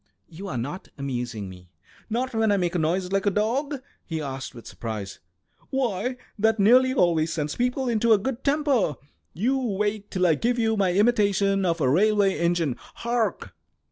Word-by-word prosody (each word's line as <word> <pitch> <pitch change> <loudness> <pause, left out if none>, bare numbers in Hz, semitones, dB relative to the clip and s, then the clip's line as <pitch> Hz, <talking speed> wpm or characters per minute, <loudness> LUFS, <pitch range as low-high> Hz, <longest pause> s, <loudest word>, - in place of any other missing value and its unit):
"You 185 +5 -9
are 180 - -3
not 145 +11 -5
amusing 120 -6 -4
me!" 90 -1 -12 0.4
"Not 250 +3 -1
when 225 -1 +2
I 200 - +3
make 175 -2 0
a 180 - 0
noise 180 +4 0
like 195 +1 +1
a - - +7
dog?" 255 +7 -1 0.2
he 160 -1 -4
asked, 135 -3 -5
with 115 - -11
surprise. 105 -4 -6 0.5
"Why, 250 -2 -1 0.2
that 220 +1 +2
nearly 250 +6 +5
always 170 - +2
sends 150 -2 -2
people 250 +2 0
into 230 -1 +2
a 220 - +7
good 245 +5 -4
temper. 280 - +2 0.4
You 250 +10 +1
wait 210 -3 -2
till 185 -1 0
I 170 - +5
give 240 +10 0
you 225 -1 +1
my 195 -3 +2
imitation 200 -2 +2
of 170 -1 0
a 140 - +2
railway 200 +6 +3
engine. 170 -6 +1
Hark!" 235 -1 -3
200 Hz, 175 wpm, -25 LUFS, 160-235 Hz, 0.5 s, a